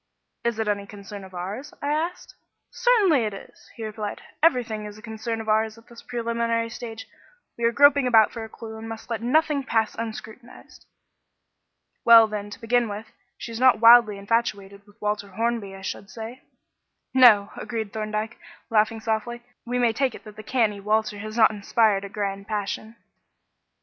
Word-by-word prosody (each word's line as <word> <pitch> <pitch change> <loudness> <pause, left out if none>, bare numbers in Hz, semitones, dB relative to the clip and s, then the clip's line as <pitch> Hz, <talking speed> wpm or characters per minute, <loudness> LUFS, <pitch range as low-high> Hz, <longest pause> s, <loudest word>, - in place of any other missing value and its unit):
"Is 235 -2 -1
it 220 -1 -2
any 200 -1 -1
concern 200 0 -10
of 190 -1 -12
ours?" 200 +11 -6
I 285 - -3
asked. 335 +4 -3 0.4
"Certainly 415 - +3
it 210 - -3
is," - - -14
he 225 - -6
replied. 215 -1 -5 0.2
"Everything 240 -9 +2
is 210 0 -9
a - - -12
concern 220 0 -4
of 220 - -7
ours 220 +1 +1
at 230 - -18
this 235 -1 -13
preliminary 230 -1 -2
stage. 225 -2 -8 0.5
We 235 - -2
are 230 - +4
groping 285 +1 +5
about 225 -3 +5
for 230 - -6
a 220 - -8
clue 220 0 -9
and 225 0 -8
must 225 +1 -8
let 225 -2 -2
nothing 290 +3 +2
pass 225 -4 0
unscrutinised." 230 +2 -9 1.2
"Well, 230 -1 +9
then, 210 -1 -5
to 205 - -10
begin 235 0 +1
with, 210 +2 -7 0.3
she 235 - -7
is 225 - -6
not 255 -2 +5
wildly 230 -2 +7
infatuated 200 -2 -2
with 205 +2 -22
Walter 210 -1 -2
Hornby, 215 0 -2
I 195 - -11
should 195 +1 -6
say." 225 +5 -8 0.7
"No," 230 -6 +6
agreed 220 -4 -5
Thorndyke, 215 +1 -3 0.3
laughing 220 0 +2
softly; 230 +2 -2 0.2
"we 245 +1 -1
may 240 -2 +2
take 260 0 0
it - - -12
that 215 -2 -12
the 215 - -9
canny 215 -4 0
Walter 215 0 0
has 215 +2 -7
not 220 -1 +6
inspired 210 -1 +1
a 200 - -7
grand 200 -1 -4
passion." 215 +1 -4
220 Hz, 180 wpm, -24 LUFS, 210-235 Hz, 1.2 s, Well